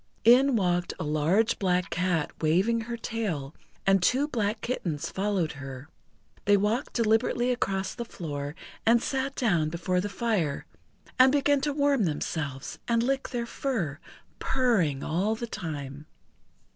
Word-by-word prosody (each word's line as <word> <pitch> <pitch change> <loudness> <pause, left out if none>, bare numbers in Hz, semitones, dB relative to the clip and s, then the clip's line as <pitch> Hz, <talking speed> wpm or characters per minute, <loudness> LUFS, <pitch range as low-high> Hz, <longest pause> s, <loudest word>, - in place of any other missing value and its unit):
In 255 +3 +6
walked 180 -4 0
a - - -2
large 155 +9 +2
Black 180 -1 +1
Cat 180 -4 0
waving 190 +9 +2
her 235 +1 -5
tail, 195 - -3 0.3
and 195 -1 +4
two 260 +10 +2
black 215 -5 -1
kittens 170 - -3
followed 190 -5 0
her. 135 +1 -8 0.6
They 205 0 +5
walked 215 +7 0
deliberately 230 +2 +2
across 195 -5 -1
the 240 - -5
floor, 145 -8 -5 0.3
and 235 +1 +5
sat 270 +2 -2
down 175 -11 +1
before 180 +2 -1
the 205 - -3
fire, 195 -8 -1 0.5
and 260 +1 +8
began 285 0 +3
to 295 - 0
warm 280 -6 +2
themselves 145 -3 -3
and 230 -1 +2
lick 270 +2 -1
their 240 -2 -2
fur, 220 - -2 0.4
purring 200 - +1
all 195 +7 0
the 235 - -4
time. 150 -7 -6
200 Hz, 145 wpm, -27 LUFS, 160-235 Hz, 0.6 s, and